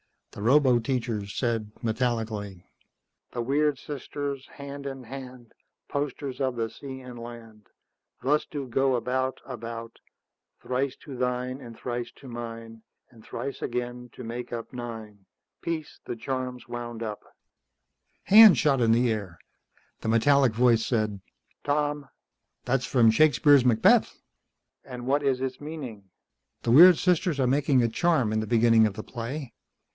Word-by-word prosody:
The - - -11
roboteacher 120 -3 +2
said 110 0 -2
metallically, 110 -5 -2 0.7
"_The 120 - -2
weird 145 +2 +2
sisters, 140 -1 -5
hand 140 0 -8
in 135 -1 -6
hand, 125 -1 -10 0.4
Posters 140 -2 -3
of 130 -2 0
the 115 -1 -2
sea 130 +1 -9
and 125 -2 -10
land, 115 -3 -11 0.6
Thus 150 +3 +2
do 145 -3 -5
go 135 +1 +1
about, 130 +2 -1
about: 115 -2 -7 0.6
Thrice 130 +1 -1
to 135 -3 -8
thine, 125 +1 -2
and 115 -4 -11
thrice 120 -1 -4
to 135 - -14
mine, 115 -1 -8 0.3
And 115 -3 -17
thrice 135 +4 -6
again, 125 0 -4
to 125 - -9
make 120 +1 -6
up 115 -1 -6
nine. 110 -5 -8 0.4
Peace! 160 -3 -4
the - - -4
charm's 125 0 -4
wound 120 -1 -6
up._" 105 -2 -4 1.0
Hands 215 -1 +9
shot 140 -4 +2
into 115 0 +4
the 120 -1 +2
air. 100 -6 -4 0.6
The - - -6
metallic 130 +2 +4
voice 115 -1 +3
said, 110 -5 -1 0.5
"Tom?" 145 -1 0 0.6
"That's 125 0 0
from 115 -4 +4
Shakespeare's 140 +1 +5
Macbeth." 115 -3 +4 0.7
"And 125 -1 -8
what 140 +3 +1
is 130 -2 +1
its 130 -1 -3
meaning?" 135 -10 -7 0.6
"The 115 - +1
weird 170 +6 +9
sisters 180 -4 +1
are 130 - +3
making 135 -1 +3
a 115 - +2
charm 135 -3 +1
in 110 - +1
the 110 - -3
beginning 115 -1 +5
of 105 - -5
the 110 +1 -7
play. 120 +2 -6
125 Hz, 145 wpm, -27 LUFS, 115-135 Hz, 1.0 s, Hands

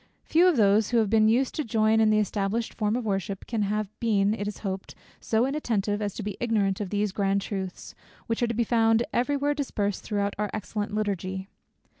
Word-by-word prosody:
Few 340 +3 +4
of 350 -6 +3
those, 210 0 +4
who 240 - +2
have 220 -3 +2
been 220 -1 +5
used 250 +4 +2
to 305 - -2
join 220 -1 +2
in 220 -1 +4
the 215 - +4
established 210 +2 -1
form 215 0 0
of 245 -2 -2
worship, 195 -1 -2
can 225 -3 -2
have 210 +1 0
been, 210 -3 +2
it 205 -2 -3
is 210 - -5
hoped, 190 0 -4 0.2
so 225 +2 +1
inattentive, 220 -7 -1
as 205 -2 -3
to 215 - -5
be 205 0 -4
ignorant 210 -4 0
of 200 - -3
these 205 0 0
grand 195 0 0
truths, 190 -3 -5 0.3
which 230 +1 -2
are 240 - +3
to 235 - -2
be 235 - +2
found 225 0 +3
every 280 +4 +1
where 290 +1 +1
dispersed 210 -9 -2
throughout 205 -1 -1
our 210 -1 0
excellent 210 0 -4
Liturgy. 190 -2 -2
215 Hz, 215 wpm, -26 LUFS, 200-230 Hz, 0.3 s, been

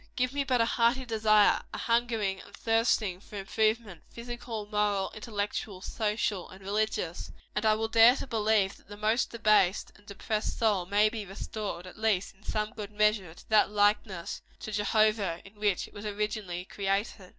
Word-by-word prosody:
Give 255 +1 0
me 285 0 0
but 255 -3 +2
a - - +4
hearty 240 +3 +2
desire, 215 -2 +4
a - - -5
hungering 230 -5 0
and - - -14
thirsting 225 -4 +1
for 205 - -13
improvement 215 -2 -1
physical, 235 -2 -6
moral, 205 -2 0
intellectual, 210 -2 -4
social 210 -3 -2
and 190 - -12
religious 200 -4 -2 0.2
and 210 +1 +1
I 215 - +5
will 225 +1 -1
dare 230 +2 +7
to - - -5
believe 215 -4 +1
that - - -24
the 205 +1 -10
most 215 +3 +1
debased 215 -5 +2
and 205 +1 -22
depressed 210 +2 -3
soul 205 -6 +1
may 205 +2 +4
be 220 -1 -5
restored, 195 -1 -6
at 185 - -12
least 215 -4 +1
in 195 - -28
some 215 0 -2
good 210 -2 -7
measure, 210 -5 +1
to - - -17
that 215 -1 +5
likeness 205 -3 0 0.2
to 215 - -6
Jehovah 210 -3 +2
in 205 +1 -16
which 205 -3 +1
it - - -20
was 205 +1 -6
originally 205 -4 -3
created. 195 0 -2
210 Hz, 175 wpm, -29 LUFS, 200-220 Hz, 0.2 s, dare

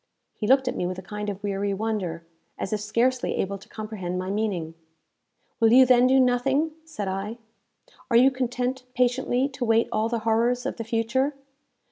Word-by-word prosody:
He 210 - -4
looked 265 +1 +4
at 250 - -1
me 175 - -1
with 185 0 -4
a 185 - -7
kind 210 +2 -5
of 200 0 -6
weary 200 0 -1
wonder, 190 -6 -3 0.3
as 195 - -3
if 210 - 0
scarcely 240 +4 0
able 195 +1 -2
to - - -17
comprehend 210 -5 -5
my 185 +1 -3
meaning. 195 -6 -2 0.9
"Will 225 -2 +4
you 260 +2 +8
then 250 0 +5
do 265 +1 +4
nothing?" 265 +5 +2
said 215 -11 -5
I. 195 +4 -4 0.7
"Are 235 - +5
you 260 +3 +6
content 255 0 -2
patiently 250 +1 +1
to 270 -2 -5
await 225 -1 +2
all 220 +1 0
the 235 -1 -2
horrors 235 +3 +2
of - - -3
the 230 - -4
future? 235 +5 0
230 Hz, 185 wpm, -25 LUFS, 205-255 Hz, 0.9 s, you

